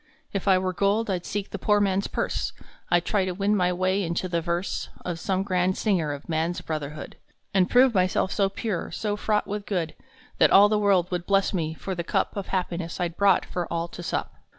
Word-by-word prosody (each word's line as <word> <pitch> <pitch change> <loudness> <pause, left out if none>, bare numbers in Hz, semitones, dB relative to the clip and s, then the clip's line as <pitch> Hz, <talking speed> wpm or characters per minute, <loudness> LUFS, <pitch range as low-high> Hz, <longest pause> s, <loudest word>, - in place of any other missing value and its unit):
If 195 0 -3
I 190 -1 +6
were 185 0 -1
gold, 205 +3 +1
I 185 - 0
d 175 - -18
seek 205 -1 -4
the - - -5
poor 210 -1 +3
man 195 -2 +2
s 200 - -2
purse. - - -2 0.4
I 175 - +5
d - - -26
try 205 -3 +1
to 185 -1 -2
win 200 +2 +1
my 180 -2 +2
way 185 +2 +1
into 170 0 -1
the 170 -2 -1
verse 170 +2 -2 0.2
Of 175 -2 -3
some 190 +2 0
grand 185 -1 +1
singer 180 -9 +1
of 145 0 -7
Man 160 0 0
s 175 - -4
Brotherhood, 150 -1 -5 0.4
And 190 -1 +3
prove 250 0 +5
myself 185 0 +1
so 200 -2 +2
pure, 195 -2 -3
so 210 -1 -2
fraught 210 0 0
with 205 0 -5
good, 175 -6 -1 0.5
That - - +6
all 205 +2 +7
the 210 0 +2
world 190 -4 +2
would 175 -1 -3
bless 195 0 +2
me 160 -3 -1
for 190 - -5
the 170 -1 -3
cup - - -1
Of 200 -2 -4
happiness 175 -2 -3
I 175 -1 0
d 165 - -16
brought 200 0 +4
for 175 -2 -4
all 170 0 -1
to 175 - -9
sup. 175 - -3
185 Hz, 240 wpm, -26 LUFS, 175-200 Hz, 0.5 s, all